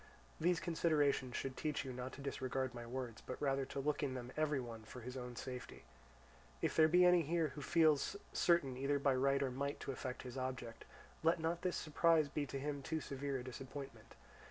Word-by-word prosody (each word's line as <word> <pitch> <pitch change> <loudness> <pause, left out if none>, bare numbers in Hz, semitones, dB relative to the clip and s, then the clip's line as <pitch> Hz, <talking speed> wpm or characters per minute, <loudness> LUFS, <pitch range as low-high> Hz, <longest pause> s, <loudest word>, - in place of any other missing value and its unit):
These 175 +1 +3
considerations 150 -7 +1
should 135 -1 -2
teach 150 -3 -1
you 130 - -4
not 125 +1 -4
to 140 - -8
disregard 130 -2 -2
my 120 -1 -7
words, 120 -2 -5
but 130 - -6
rather 135 -1 +1
to 140 - -5
look 145 +1 0
in 135 -3 -1
them 125 0 -5
every 150 -2 +1
one 115 -3 -6
for 115 +3 -10
his 125 +2 -6
own 125 -1 -5
safety. 130 +2 -6 0.8
If - - 0
there 155 -1 +7
be 180 +3 +6
any 180 -1 +7
here 165 0 +1
who 145 +2 -8
feels 155 -1 +3 0.2
certain 170 -7 +3
either 140 +2 +1
by 140 -1 +3
right 135 +2 +3
or 130 - 0
might 140 +3 -2
to - - -3
effect 130 0 -5
his 130 +1 -5
object, 130 -3 -4 0.4
let 165 +1 +3
not 165 +2 -1
this 180 -1 0
surprise 155 -1 +3
be 145 0 -2
to 135 - -4
him 145 +1 -3
too 160 +4 -2
severe 140 -1 -3
a 125 - -5
disappointment. 135 +2 -8
140 Hz, 205 wpm, -38 LUFS, 130-155 Hz, 0.8 s, there